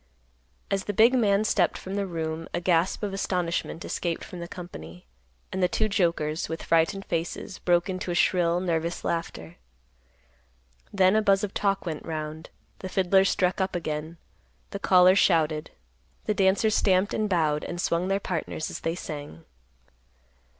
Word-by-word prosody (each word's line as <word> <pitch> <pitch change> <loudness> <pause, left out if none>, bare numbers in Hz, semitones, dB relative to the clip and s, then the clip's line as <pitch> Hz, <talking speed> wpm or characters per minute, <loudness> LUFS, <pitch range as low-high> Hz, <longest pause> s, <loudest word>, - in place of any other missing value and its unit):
As 195 -1 0
the 205 - -3
big 230 +5 +6
man 210 -5 +3
stepped 200 -4 +1
from 190 - -7
the 200 -1 -1
room, 165 -2 -4
a - - 0
gasp 175 +2 +1
of 200 -2 -2
astonishment 180 -3 -2
escaped 170 -2 -3
from 180 - -9
the 170 - -6
company, 90 - -10 0.5
and 190 - -2
the 180 - +4
two 215 +4 0
jokers, 170 -6 0
with 160 - -5
frightened 165 +4 +1
faces, 170 +4 -4
broke 175 0 +2
into 185 -1 -4
a 175 - -1
shrill, 175 -1 +2
nervous 170 -1 -2
laughter. 85 - -4 1.3
Then 190 0 +4
a 220 - +4
buzz 195 -1 +3
of 200 - -3
talk 195 -2 0
went 160 -3 -4
round; 155 0 -5 0.3
the 185 - -6
fiddlers 190 +1 +3
struck 185 +1 +1
up 190 - -1
again; 155 0 -4 0.5
the 200 - -5
callers 185 0 +5
shouted; 155 -3 +2 0.6
the 215 - +1
dancers 200 +2 +2
stamped, 190 0 +2
and 215 -1 0
bowed, 155 -5 +1
and 175 - -5
swung 175 +1 0
their 195 +1 +1
partners 165 -4 -4
as - - -5
they 165 +1 -2
sang. 145 - -8
180 Hz, 165 wpm, -26 LUFS, 165-195 Hz, 1.3 s, big